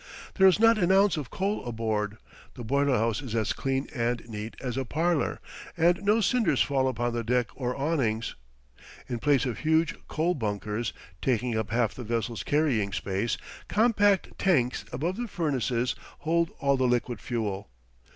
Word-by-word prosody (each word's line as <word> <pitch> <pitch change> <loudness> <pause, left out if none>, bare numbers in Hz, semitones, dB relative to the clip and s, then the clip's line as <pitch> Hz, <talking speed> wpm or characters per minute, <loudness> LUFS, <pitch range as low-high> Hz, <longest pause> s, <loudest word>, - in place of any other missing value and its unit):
There 190 -1 +6
is 190 +1 +4
not 225 0 +5
an 180 -1 +3
ounce 195 0 +5
of 145 -6 -5
coal 200 +2 -2
aboard, 110 -3 -2 0.4
the 125 - -7
boiler 140 +2 +2
house 115 +1 0
is 125 -5 -5
as 110 -2 +1
clean 135 0 -1
and 120 -2 -1
neat 110 0 -6
as 125 -3 -4
a 135 - -1
parlor, 160 +5 0 0.4
and 175 +2 +3
no 210 +3 +3
cinders 210 - +2
fall 135 -2 +1
upon 120 -1 -1
the 120 0 -2
deck 120 +1 +1
or 125 -2 -3
awnings. 135 -7 0 0.7
In 120 - -3
place 145 -2 +3
of 125 -3 -3
huge 160 +1 +2
coal 165 +3 0
bunkers, 105 - -2 0.3
taking 125 -2 0
up 110 -1 -1
half 115 -1 +1
the 125 - -7
vessel's 115 -1 -2
carrying 130 -9 +1
space, 100 +4 -1 0.3
compact 205 -3 +2
tanks 130 -10 +2
above 165 +10 -2
the 240 0 -3
furnaces 130 - 0 0.3
hold 170 +1 +1
all 140 -2 +2
the 130 -1 +2
liquid 120 -1 0
fuel. 105 -4 -3
130 Hz, 170 wpm, -28 LUFS, 115-165 Hz, 0.7 s, There